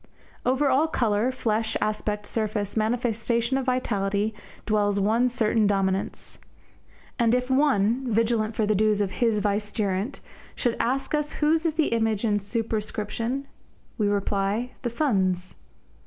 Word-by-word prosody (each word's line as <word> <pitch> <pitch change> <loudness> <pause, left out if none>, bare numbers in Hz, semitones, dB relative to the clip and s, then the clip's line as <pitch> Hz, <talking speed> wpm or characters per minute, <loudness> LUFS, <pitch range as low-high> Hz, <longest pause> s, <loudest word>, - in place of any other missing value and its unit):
Over 265 +3 +3
all 275 +4 +3
colour, 230 -4 +1
flesh, 220 -3 -1
aspect, 210 -1 -2
surface, 210 -2 -2
manifestation 235 +2 0
of 270 -1 -1
vitality, 210 -4 0 0.3
dwells 205 -2 +1
one 225 +5 +2
certain 225 -3 +2
dominance. 195 -1 -1 0.8
And 235 0 +4
if 250 +1 -1
One, 260 -3 +2
vigilant 220 0 +1
for 220 - +1
the 215 - +2
dues 210 0 +2
of 200 -2 0
His 225 +3 +1
vicegerent, 205 +1 -1 0.4
should 240 -3 0
ask 265 +4 -1
us 300 0 0
whose 315 +2 +2
is 315 - -2
the 315 -2 +2
image 225 -2 0
and 205 -2 +1
superscription? 225 +4 -3 0.5
We 210 - +2
reply, 205 +3 0
The 240 - -1
Sun's. 190 - 0
220 Hz, 135 wpm, -25 LUFS, 205-250 Hz, 0.8 s, And